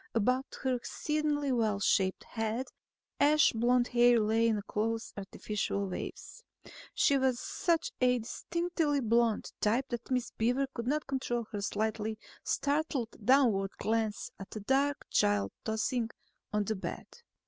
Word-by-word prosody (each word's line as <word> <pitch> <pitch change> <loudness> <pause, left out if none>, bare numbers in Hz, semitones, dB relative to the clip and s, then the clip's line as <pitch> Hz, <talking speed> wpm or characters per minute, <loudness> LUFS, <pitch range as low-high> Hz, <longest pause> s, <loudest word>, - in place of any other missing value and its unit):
About 250 +4 +2 0.2
her 260 -1 +2
exceedingly 295 +3 -1
well 220 -5 +1
shaped 190 -1 +2
head 225 +3 -3 0.5
ash 300 +1 +5
blonde 240 +2 +2
hair 240 -1 +5
lay 225 +2 +3
in 220 -2 +2
close 225 +1 -2
artificial 200 0 -3
waves. 190 - -7 0.5
She 280 -2 +4
was 260 -2 +1
such 335 -3 0
a 250 0 +4
distinctively 320 +5 -1
blonde 230 -2 +1
type 240 +6 +1
that 240 -2 -5
Miss 250 -2 0
Beaver 250 +5 +1
could 235 -1 -5
not 300 +3 0
control 245 -3 -2
her 205 - -3
slightly 215 +1 -1 0.3
startled 285 -5 -1
downward 225 -6 +4
glance 220 -1 -1
at 195 - -8
the 215 - -6
dark 275 +6 +1
child 100 -1 +2
tossing 225 +2 0 0.4
on 210 0 +1
the 220 +2 -2
bed. 190 - -5
235 Hz, 135 wpm, -31 LUFS, 215-265 Hz, 0.5 s, ash